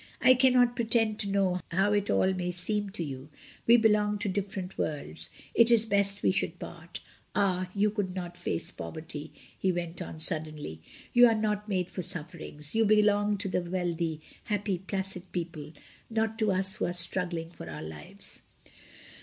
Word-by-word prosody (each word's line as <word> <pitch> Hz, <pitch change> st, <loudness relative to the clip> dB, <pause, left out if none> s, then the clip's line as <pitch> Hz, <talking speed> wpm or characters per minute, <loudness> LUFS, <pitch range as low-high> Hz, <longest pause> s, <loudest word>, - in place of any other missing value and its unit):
"I 255 Hz, -, +7 dB
cannot 250 Hz, -1 st, +4 dB
pretend 225 Hz, -2 st, +1 dB
to 200 Hz, -, 0 dB
know 195 Hz, -2 st, +1 dB
how 195 Hz, +4 st, +2 dB
it 205 Hz, -1 st, 0 dB
all 190 Hz, 0 st, +2 dB
may 180 Hz, -1 st, -3 dB
seem 205 Hz, +3 st, +1 dB
to 190 Hz, -3 st, -1 dB
you; 135 Hz, -1 st, -7 dB, 0.4 s
we 235 Hz, +1 st, +8 dB
belong 210 Hz, -2 st, +3 dB
to 205 Hz, -, -1 dB
different 195 Hz, -1 st, -4 dB
worlds. 80 Hz, -, -3 dB, 0.2 s
It 230 Hz, 0 st, +5 dB
is 230 Hz, -2 st, +6 dB
best 200 Hz, -1 st, +3 dB
we -, -, +4 dB
should 190 Hz, -, -1 dB
part -, -, -9 dB, 0.3 s
Ah! 185 Hz, -2 st, +1 dB
you 205 Hz, +1 st, +2 dB
could 200 Hz, -4 st, -3 dB
not 175 Hz, -2 st, -5 dB
face 175 Hz, -, -1 dB
poverty," 155 Hz, -, -7 dB, 0.2 s
he 190 Hz, -, 0 dB
went 175 Hz, -1 st, -4 dB
on -, -, -7 dB
suddenly. 155 Hz, -, -1 dB, 0.3 s
"You 245 Hz, 0 st, +8 dB
are 225 Hz, -, +2 dB
not 210 Hz, -1 st, -1 dB
made 185 Hz, -3 st, -1 dB
for 185 Hz, -, -4 dB
sufferings; 165 Hz, -4 st, -3 dB
you 225 Hz, -, +3 dB
belong 210 Hz, -1 st, +3 dB
to 200 Hz, +1 st, -1 dB
the 185 Hz, -, 0 dB
wealthy, 170 Hz, -3 st, -2 dB, 0.2 s
happy, 205 Hz, -4 st, -1 dB
placid 190 Hz, -1 st, -4 dB
people, 165 Hz, -4 st, -5 dB, 0.4 s
not 225 Hz, 0 st, -1 dB
to 215 Hz, -2 st, +2 dB
us 190 Hz, +2 st, +3 dB
who -, -, -1 dB
are 175 Hz, -, -2 dB
struggling 170 Hz, -1 st, +2 dB
for 80 Hz, -, -10 dB
our 75 Hz, -1 st, -7 dB
lives." 75 Hz, -1 st, -8 dB
190 Hz, 175 wpm, -29 LUFS, 170-210 Hz, 0.4 s, we